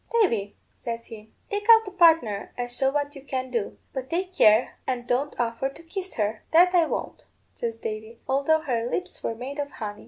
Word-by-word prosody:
'Davy,' 230 - +1 0.2
says 230 0 -5
he, 220 -2 -11 0.2
'take 410 +1 -2
out 450 -1 +8
a - - -5
partner, 325 - +3
and 245 0 -3
show 265 +2 +2
what 290 +1 -1
you 275 - -9
can 260 -2 -4
do, 230 -5 -2 0.2
but 265 -1 -5
take 365 +2 -2
care 220 - +4
and 250 -2 -2
don't 255 +4 -1
offer 235 +2 0
to 275 - -14
kiss 375 +3 -6
her.' 215 0 -1
'That 355 +3 +6
I 340 -3 +4
won't,' - - -4 0.3
says 230 -1 -4
Davy, 220 +1 -6
'although 280 +4 +2
her 240 -4 -1
lips 365 +6 -4
were 230 - -2
made 265 +5 -6
of 285 0 -2
honey.' 210 -6 -6
265 Hz, 205 wpm, -26 LUFS, 230-325 Hz, 0.3 s, out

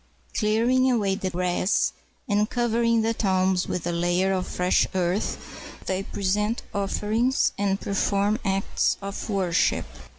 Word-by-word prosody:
Clearing 240 +5 +2
away 210 -6 +1
the 190 -1 -2
grass, 180 +2 0 0.3
and 210 +1 +1
covering 230 -1 +1
the 225 +1 +1
tombs 190 -3 +1
with 180 - -3
a 175 - 0
layer 175 +3 +1
of 185 -1 -2
fresh 180 0 +2
earth, 185 +2 0 0.5
they 190 0 -1
present 205 +3 -1
offerings 215 +5 +1
and 195 -1 0
perform 200 +2 0
acts 195 -1 0
of 200 +2 -6
worship. 190 -5 +1
200 Hz, 130 wpm, -25 LUFS, 185-220 Hz, 0.5 s, Clearing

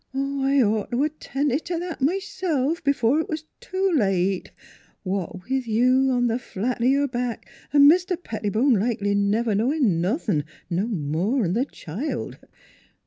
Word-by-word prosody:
" - - -47
I'd 275 0 +1
ought 210 -1 0
t' 240 - -1
'a' 300 +2 +2
tended 290 -1 -2
t' 345 -1 -2
that 345 -3 -5
m'self 335 -3 -1
b'fore 280 +2 +2
'twas 315 -1 -5 0.2
too 380 +1 -1
late 195 -5 +1 0.5
what 185 -1 -4
with 265 -1 -1
you 255 +4 +3
on 245 -1 +2
th' 235 +2 -1
flat 235 +2 -3
o' - - +2
your 280 +2 +3
back 245 -2 -4 0.2
an' 285 -1 +7
Mr. 360 +3 +4
Pettibone 225 - 0
likely 205 -2 0
never 205 +3 +1
knowin' 225 - +1
nothin', 185 - 0 0.3
no 185 +6 0
more'n 180 - 0
th' 255 +6 -1
child. 205 - -5
250 Hz, 150 wpm, -24 LUFS, 205-285 Hz, 0.5 s, an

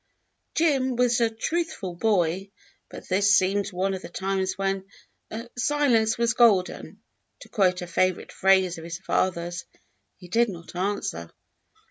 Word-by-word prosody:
Jim 270 -6 +2
was 245 0 +2
a 230 - +3
truthful 225 - -3
boy, 190 -1 0 0.4
but - - -11
this 200 +2 +4
seemed 195 +2 0
one 190 +2 -1
of 190 - -5
the - - -9
times 190 +1 -2
when 195 0 -1 0.7
"silence 245 -5 +2
was 235 0 +2
golden," 210 -7 +2 0.4
to - - -13
quote 185 -4 +1
a - - -4
favorite 185 +1 0
phrase 190 -3 +3
of - - -10
his 165 0 -6
father's. 175 -2 -1 0.5
He 180 - -13
did 230 +6 +2
not 170 -2 -10
answer. 180 - -3
195 Hz, 140 wpm, -25 LUFS, 180-230 Hz, 0.7 s, this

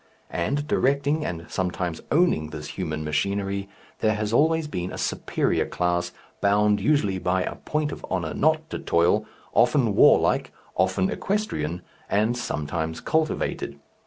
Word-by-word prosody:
And, 140 +12 -1
directing 140 +3 +1
and 85 - -4
sometimes 90 -2 -2
owning 150 - +3
this 75 - -7
human 75 0 -3
machinery, 100 +6 -1 0.3
there 110 -1 +2
has 105 +1 -2
always 160 +4 +3
been 90 -10 -4
a - - -6
superior - - 0
class, 90 0 0 0.3
bound 105 +1 +3
usually 120 -11 +2
by 90 +1 +1
a - - -3
point 150 -1 -2
of - - -8
honour 85 -4 -1
not 155 +1 +2
to - - -3
toil, 85 +6 +2 0.3
often 120 -1 +3
warlike, - - +5 0.2
often 95 0 +1
equestrian, 90 - -2 0.3
and 110 +4 +2
sometimes 80 -6 -3
cultivated. 155 - -1
100 Hz, 135 wpm, -25 LUFS, 85-140 Hz, 0.3 s, warlike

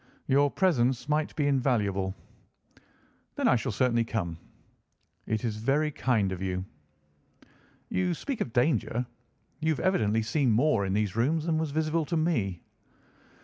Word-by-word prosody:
"Your 140 +2 +3
presence 135 -9 +1
might 150 +1 0
be 150 - 0
invaluable." 105 -9 +1 1.2
"Then - - +1
I - - +5
shall 120 +2 -1
certainly 120 +1 +2
come." 100 -7 -3 0.9
"It 110 +1 -1
is 110 -2 -2
very 140 +7 +1
kind 115 -9 +1
of 95 -1 -5
you." 95 -1 -2 1.2
"You 180 -2 0
speak 270 - -4
of 120 - -2
danger. 125 -1 +1 0.5
You 160 0 +1
have - - -5
evidently 115 - +1
seen 130 +4 +1
more 115 -3 +2
in 95 - -1
these 105 -1 0
rooms 150 +7 +1
than 160 -2 +1
was 160 -1 -1
visible 155 +2 0
to 170 +2 -1
me." 115 - 0
125 Hz, 145 wpm, -28 LUFS, 110-155 Hz, 1.2 s, I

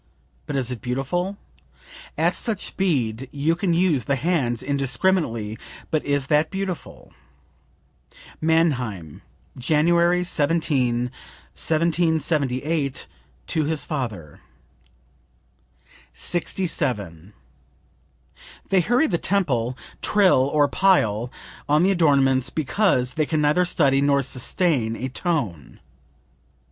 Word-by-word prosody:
But 145 - -4
is 130 -2 -1
it 120 -4 -6
beautiful? 135 - -2 0.8
At - - +2
such 220 -5 -3
speed 130 - -1
you 150 +3 0
can 175 +1 -1
use 165 -8 +2
the 140 - +1
hands 135 -6 0
indiscriminately; 135 - 0 0.3
but 155 - 0
is 145 -1 0
that 150 +2 +2
beautiful?" 195 -3 -6 1.3
(Mannheim, 130 - 0 0.4
January 170 +6 +3
17, 145 -7 0 0.4
1778, 155 -3 0 0.4
to 155 -2 -1
his 155 0 -2
father.) 110 - -5 1.7
67. 120 - -2 1.4
"They 190 -2 +4
hurry 245 - +2
the 175 - 0
tempo, 130 - 0 0.3
trill 185 -10 +3
or 145 -1 +3
pile 120 - +2 0.4
on 150 +3 +4
the 190 - +4
adornments 135 -7 +3
because 145 -5 0
they 155 +1 0
can 155 -2 0
neither 150 +5 +3
study 140 -6 +2
nor 140 -1 +2
sustain 130 -2 0
a 130 +3 -4
tone." 130 - -3
145 Hz, 100 wpm, -23 LUFS, 125-170 Hz, 1.7 s, They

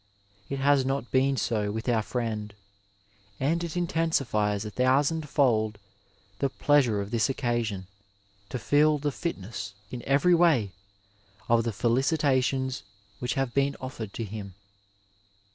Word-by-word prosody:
It 140 - -2
has 140 0 +3
not 135 -1 -2
been 135 +1 +2
so 105 -2 0
with 110 +3 -5
our 115 -3 +3
friend, 110 -3 -3 0.8
and 165 +6 +1
it 170 0 -4
intensifies 135 - 0
a 105 - -5
thousandfold 130 -4 +2 0.6
the 140 - +1
plea 145 +2 +4
sure 110 -6 0
of 100 - -6
this 115 -4 +2
occasion 120 -7 -1 0.6
to 130 - -3
feel 150 +6 +3
the 145 0 -1
fitness, 100 - -5 0.2
in 125 - -5
every 140 +6 +4
way, 160 - +4 0.8
of 115 0 +3
the 115 - 0
felicitations 130 - +1 0.4
which 125 - -2
have 135 -3 -1
been 140 0 +1
ofitered 115 -5 -6
to 115 - -4
him. 100 -3 -7
130 Hz, 135 wpm, -27 LUFS, 110-140 Hz, 0.8 s, plea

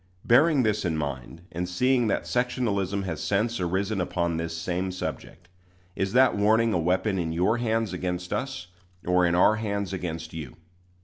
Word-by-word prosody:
Bearing 140 +3 +5
this 105 -1 0
in 85 -4 -1
mind, 70 +2 -5
and 90 +1 -3
seeing 125 +5 +2
that - - 0
sectionalism 105 -6 -1
has 80 -5 -4
since 110 +3 0
arisen 95 +3 -1
upon 85 -2 -1
this 80 0 -3
same 90 +2 -2
subject, 90 -1 -6 0.5
is 95 +1 -2
that 130 +1 +5
warning 110 +2 +3
a 90 - +1
weapon 95 +4 +1
in 80 -2 -2
your 95 +8 +1
hands 115 -4 0
against 90 0 -3
us, 130 -8 -3 0.4
or 90 0 +3
in 85 - +1
our 105 +4 +5
hands 100 -3 -3
against 80 -3 -5
you? 75 -6 -7
95 Hz, 170 wpm, -26 LUFS, 85-110 Hz, 0.5 s, Bearing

